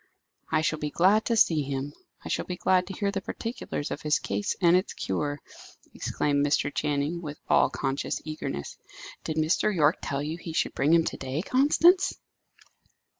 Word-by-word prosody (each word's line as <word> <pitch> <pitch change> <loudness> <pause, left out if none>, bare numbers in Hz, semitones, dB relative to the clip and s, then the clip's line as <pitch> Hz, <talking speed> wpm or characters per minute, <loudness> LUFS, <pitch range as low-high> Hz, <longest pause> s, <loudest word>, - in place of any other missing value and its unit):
"I 155 -1 +3
shall 155 -1 0
be 150 - -2
glad 195 +8 +3
to 235 - +1
see 165 -8 +4
him; 140 +1 -4 0.3
I - - -5
shall - - -1
be 180 - -4
glad 180 0 +2
to 195 - -6
hear 200 +1 -1
the 195 -1 -3
particulars 225 - -5
of - - -4
his 150 -1 +2
case 205 - -2
and 175 -1 +5
its 185 +2 0
cure," 145 +9 -2 0.5
exclaimed 145 -1 0
Mr. 145 -1 +1
Channing, 150 +3 -1
with 150 -3 -7
all - - +4
conscious 135 0 -2
eagerness. 155 - -5 0.5
"Did 155 - -4
Mr. 160 +6 +2
Yorke 155 -4 +3
tell 140 -1 -2
you 155 +3 -4
he 165 -1 -7
should - - 0
bring 145 +3 +1
him 165 0 +5
to - - -3
day, 135 +6 -3
Constance?" 315 - +4
155 Hz, 180 wpm, -27 LUFS, 145-185 Hz, 0.5 s, and